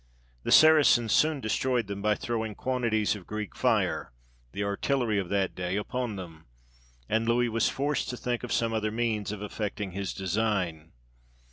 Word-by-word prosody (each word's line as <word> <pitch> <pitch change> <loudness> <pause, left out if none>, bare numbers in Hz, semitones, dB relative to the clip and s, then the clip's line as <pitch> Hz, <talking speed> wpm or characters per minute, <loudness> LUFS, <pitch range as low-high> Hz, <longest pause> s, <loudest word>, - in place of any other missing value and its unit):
The - - -3
Saracens 150 -8 +6
soon 155 -2 +3
destroyed 120 +1 0
them 100 0 -6
by 105 +1 +2
throwing 110 -2 -3
quantities 115 -5 0
of 95 -4 -11
Greek 105 -2 -5
fire, - - +1 0.4
the 100 - -3
artillery 110 +2 0
of 95 -3 -4
that 100 -2 0
day, 90 +1 -3
upon 115 +2 -2
them, 85 -6 -10 0.6
and 110 +1 0
Louis 120 +1 +2
was 115 0 +1
forced 145 +1 -1
to 125 - -4
think 120 0 -2
of 125 - -5
some 115 -1 +1
other 110 -1 0
means 110 -2 -1
of 105 -1 -6
effecting 105 -1 -4
his 100 +1 -3
design. 95 -5 -1
110 Hz, 165 wpm, -28 LUFS, 100-120 Hz, 0.6 s, Saracens